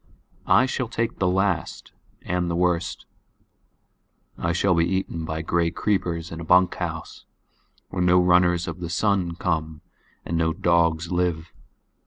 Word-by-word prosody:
I 130 - +5
shall 130 -1 -2
take 115 0 -3
the 95 - +2
last 95 -2 -1 0.3
and 90 0 -1
the 85 - -1
worst.I 85 -1 -5
shall 90 +3 +2
be 85 -1 +3
eaten 90 -3 -2
by 80 0 -4
gray 85 +1 +1
creepers 85 -3 -2
in 80 - -6
a - - -6
bunkhouse 90 +2 0 0.6
where 90 - -3
no 90 0 +5
runners 90 -1 +3
of 85 +1 -6
the 85 -2 -5
sun 90 -1 0
come 80 -3 -2 0.4
and 85 - -3
no 80 0 +1
dogs 85 0 +1
live. 90 -2 -1
85 Hz, 140 wpm, -24 LUFS, 85-90 Hz, 0.6 s, I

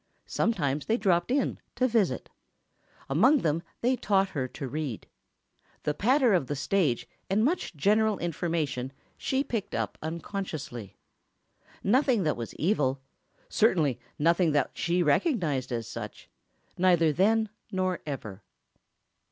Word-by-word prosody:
Sometimes 145 -10 0
they 225 - +2
dropped 180 -4 +2
in, 270 +1 0 0.2
to 255 +1 +2
visit. 205 - 0 0.8
Among 245 - +4
them 160 0 +1 0.2
they 250 +2 +3
taught 195 -5 +2
her 135 -8 -2
to 135 +2 -6
read. 140 -4 -4 0.8
The 150 - 0
patter 250 - +3
of 170 -8 +2
the 145 - -2
stage 145 -2 +1 0.2
and 210 +4 +3
much 315 - -1
general 210 +7 +3
information 160 -6 -2 0.2
she 265 +1 0
picked 225 -7 -3
up - - -3
unconsciously. 160 - -5 0.9
Nothing 245 -1 +3
that 155 - +1
was 115 -1 -6
evil—certainly 145 - 0 0.2
nothing 170 +1 +3
that 145 -3 +2
she 175 +1 +1
recognized 150 - +1
as 115 -2 -2
such—neither 175 -4 -1
then 220 +6 +3 0.2
nor 185 -1 0
ever. 110 -8 -5
170 Hz, 120 wpm, -28 LUFS, 145-215 Hz, 0.9 s, Among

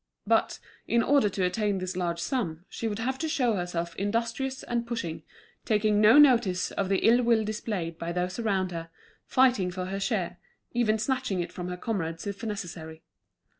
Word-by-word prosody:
But, - - +2 0.3
in 235 0 +3
order 275 -6 +4
to 190 -1 -1
attain 205 +2 0
this 185 0 -4
large 170 -2 -1
sum, 175 - -2
she 230 - -4
would 205 -2 -2
have 260 +4 -2
to 320 - -1
show 260 -7 +2
herself 175 -3 -3
industrious 230 +6 -2
and 235 -1 -2
pushing, 205 -9 -4 0.4
taking 210 -1 +2
no 220 +6 +7
notice 235 -11 +5
of 195 -2 -2
the 195 - +1
ill 240 +2 +6
will 230 -2 +3
displayed 205 -6 -3
by 170 0 -3
those 180 +3 -2
around 195 -5 0
her, 165 -1 -6 0.4
fighting 250 -8 +3
for 180 0 -4
her 195 +1 -3
share, 190 -3 -2 0.3
even 225 -3 +2
snatching 250 -4 -1
it 175 0 -3
from 180 -1 -6
her 180 0 -4
comrades 165 -6 -3
if 200 +2 -5
necessary. 165 -7 -6
205 Hz, 180 wpm, -28 LUFS, 180-235 Hz, 0.4 s, no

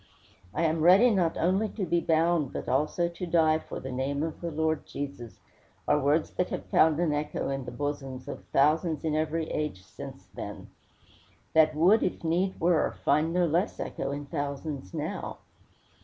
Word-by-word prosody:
"I 170 - -1
am 160 0 +1
ready 190 +9 +7
not 175 -6 +1
only 190 +5 +1
to 200 -2 -3
be 170 0 +2
bound, 165 -3 +2
but - - -5
also 150 +5 +1
to 170 +1 -6
die 160 -2 +3
for - - -7
the 135 - -6
name 135 +3 -1
of 160 -1 -4
the 170 - -2
Lord 160 -1 -1
Jesus," 140 -5 -7 0.5
are - - +4
words 145 +3 +1
that 180 - -1
have - - -4
found 160 -1 +4
an 170 -4 +1
echo 150 -1 -2
in 135 -1 -3
the - - -6
bosoms 135 -3 -4
of 145 - -7
thousands 155 +3 +2
in 160 -2 0
every 160 +1 -1
age 150 -12 -3
since - - -10
then; - - -8 0.8
that 155 -1 +5
would, 185 +8 +5
if 180 - -2
need 180 +4 0
were, 170 -1 +2
find 150 +3 +3
no 180 +1 +2
less 170 +6 0
echo - - -3
in 145 +1 -4
thousands 140 - -4
now. - - -4
155 Hz, 180 wpm, -28 LUFS, 145-170 Hz, 0.8 s, ready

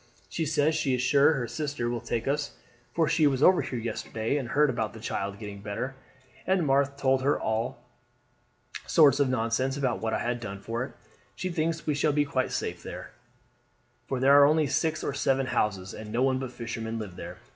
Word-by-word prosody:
She 160 -2 -2
says 155 +1 +2
she 155 -5 +1
is 125 - -1
sure 140 +3 +5
her 125 -5 -2
sister 145 -5 -3
will 120 -1 -2
take 115 0 -3
us, 145 +1 -1 0.4
for 160 +4 +1
she 160 -2 +3
was 135 0 +1
over 185 0 +6
here 125 - -4
yesterday 115 +1 -3
and 135 -5 -2
heard 145 +1 +3
about 110 -3 -2
the 110 - -10
child 100 -2 -3
getting 105 -2 -8
better, 105 +6 -4 0.5
and 185 -3 +2
Marthe 140 0 +2
told 135 -1 +2
her 140 +2 +2
all 110 +2 -1 1.1
sorts 145 -3 +5
of 140 -2 +3
nonsense 130 +2 0
about 130 -4 -1
what 110 0 -1
I - - +1
had 120 0 -2
done 100 -4 -6
for 115 +4 -3
it. 130 - -8 0.4
She 185 - -3
thinks 165 0 -1
we 150 - +1
shall 145 +1 +1
be 145 0 +2
quite 130 -2 -1
safe - - -3
there, - - -8 1.0
for 130 - -2
there 140 +2 +7
are 140 - +8
only 155 +1 +3
six 155 +3 0
or - - -2
seven 135 -1 +1
houses, 105 -6 -1
and 105 0 -8
no 120 +3 +1
one 130 -1 +2
but 130 -2 -5
fishermen 115 -1 -5
live 105 -5 -6
there. - - -8
130 Hz, 210 wpm, -28 LUFS, 115-145 Hz, 1.1 s, are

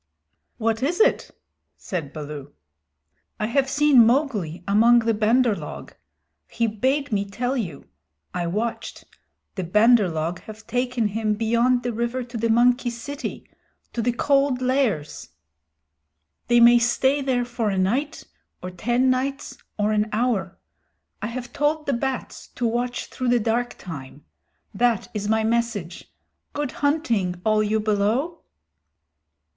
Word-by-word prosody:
"What 225 -1 0
is 315 +7 0
it?" 470 +3 +3 0.5
said 165 -7 -5
Baloo. 150 -2 -8 0.9
"I 215 - 0
have 265 +4 +1
seen 290 -4 +5
Mowgli 220 - 0
among 225 +4 +5
the 230 -1 +2
Bandar 225 +2 +3
log. - - -8 0.5
He 235 - -1
bade 260 +6 0
me 200 -2 +1
tell 245 +6 -3
you. 180 - -5 0.5
I 175 -1 -2
watched. 220 +6 -3 0.5
The 190 - -4
Bandar 210 +3 +4
log 160 +2 -3
have 215 0 -12
taken 245 -1 -1
him 215 0 -1
beyond 235 +3 +2
the 245 -1 -2
river 235 +3 -2
to 240 0 -12
the 230 0 0
monkey 245 +2 +3
city 255 +5 -6 0.5
to 235 - -1
the 245 +2 +1
Cold 275 +1 +2
Lairs. 255 - -1 1.2
They 240 0 +4
may 240 0 +7
stay 265 +4 +2
there 255 -3 0
for 240 -3 -2
a 195 - -1
night, 260 +12 -1 0.4
or 180 - -5
ten 240 +8 +1
nights, 270 +2 -2 0.2
or 210 0 +1
an 215 0 +1
hour. 215 -5 -1 0.6
I 210 - -2
have 240 +1 -6
told 300 +1 0
the 280 - 0
bats 265 +1 -4
to 245 - -2
watch 240 +1 -1
through 255 -2 -3
the 245 0 +4
dark 235 +2 -1
time. 145 -4 -9 0.5
That 230 +1 +1
is 210 -1 -3
my 220 0 +2
message. 220 -6 -2 0.4
Good 290 -3 -2
hunting, 235 - 0
all 215 -1 +3
you 215 +1 +1
below!" 215 +10 0
235 Hz, 140 wpm, -23 LUFS, 210-255 Hz, 1.2 s, may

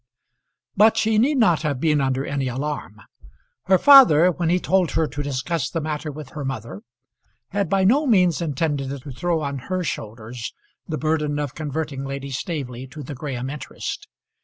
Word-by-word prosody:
But 220 +2 +5
she 220 -1 +2
need 275 +5 +3
not 175 - +4
have 145 -5 -1
been 150 -1 +2
under 135 0 0
any 140 -2 -2
alarm. 130 -5 -4 0.6
Her 190 0 +5
father, 185 - +8
when 170 -1 -1
he 180 +2 +3
told 185 -2 +2
her 160 - +2
to 145 -1 -5
discuss 145 +2 -2
the 165 - -2
matter 155 0 -4
with 145 -1 -9
her 150 -1 -6
mother, 115 -7 -5 0.7
had 200 -3 -1
by 195 -1 +2
no 275 +10 +3
means 180 - +3
intended 145 -3 -1
to 140 - -8
throw 170 +4 -1
on 140 -2 -3
her 185 -1 -1
shoulders 115 -3 -6 0.3
the 155 - -3
burden 150 -1 0
of 145 -3 -3
converting 150 -2 -4
Lady 140 0 -5
Staveley 130 -3 -4
to 145 +3 -9
the 140 - -7
Graham 130 -2 -4
interest. 145 -5 -6
150 Hz, 175 wpm, -22 LUFS, 135-175 Hz, 0.7 s, father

